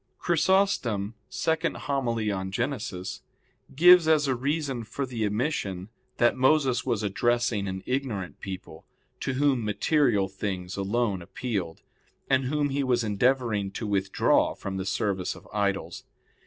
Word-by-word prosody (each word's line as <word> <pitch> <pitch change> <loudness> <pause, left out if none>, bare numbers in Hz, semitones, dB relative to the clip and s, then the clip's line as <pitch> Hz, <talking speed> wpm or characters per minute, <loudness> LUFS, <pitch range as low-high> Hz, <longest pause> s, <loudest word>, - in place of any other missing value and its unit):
Chrysostom 160 - +1 0.2
[*Hom. 140 -5 -1
ii 110 -1 0
in 95 -1 -3
Genes.] 115 -6 -3 0.5
gives 175 +2 +7
as 155 -2 +4
a 130 - +2
reason 135 -1 -2
for 125 +5 -4
the 115 -4 -2
omission 105 - -2 0.3
that 120 - +3
Moses 130 -1 +3
was 115 -5 -1
addressing 115 0 +1
an 95 0 -4
ignorant 115 - -3
people, 95 -1 -8 0.4
to 135 - -2
whom 135 -3 +2
material 105 -1 +2
things 95 -2 -4
alone 100 0 0
appealed, 95 -3 -4 0.4
and 130 -1 +2
whom 145 +2 0
he 140 +1 0
was 125 -2 +1
endeavoring 110 -1 +1
to 115 - -4
withdraw 100 -2 +2
from 95 -1 -5
the 95 0 -3
service 95 -3 -1
of 95 - -14
idols. 100 -2 -1
120 Hz, 135 wpm, -27 LUFS, 100-135 Hz, 0.5 s, gives